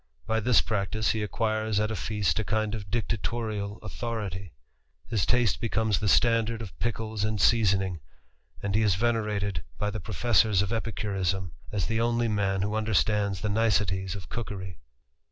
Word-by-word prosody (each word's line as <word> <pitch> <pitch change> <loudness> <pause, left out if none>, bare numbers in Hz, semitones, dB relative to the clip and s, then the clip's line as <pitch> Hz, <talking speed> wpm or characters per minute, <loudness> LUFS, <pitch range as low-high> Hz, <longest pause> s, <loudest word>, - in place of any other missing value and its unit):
y 110 0 +1
this 115 -4 +4
practice 105 +3 0
he 110 - -1
acquires 110 0 0
at 105 +1 0
a - - -2
feast 105 +3 0
a - - +1
kind 110 +1 0
of 100 -3 -5
dictatorial 110 -1 -2
ithority; 105 -5 -4 0.5
his 105 - 0
taste 120 -3 +2
becomes 110 -3 +1
the 105 - -1
standard 115 +1 +3
of 110 -5 -8
pickles 110 -2 -2
and 110 0 0
asoning, 95 -4 +3 0.6
and 100 -1 -1
he 110 - +3
is 105 -4 +3
venerated 105 -5 0
by 105 0 -1
the 110 - -4
professors 105 -2 +2
of 100 - -3
licurism, 95 -5 -1 0.2
as 100 -4 0
the 115 0 0
only 120 0 +2
man 100 -3 +1
who 105 +1 -1
understands 105 -2 +1
the 105 - -1
niceties 100 -3 +1
of 95 - -8
►okery. 95 -6 -5
105 Hz, 160 wpm, -28 LUFS, 100-110 Hz, 0.6 s, this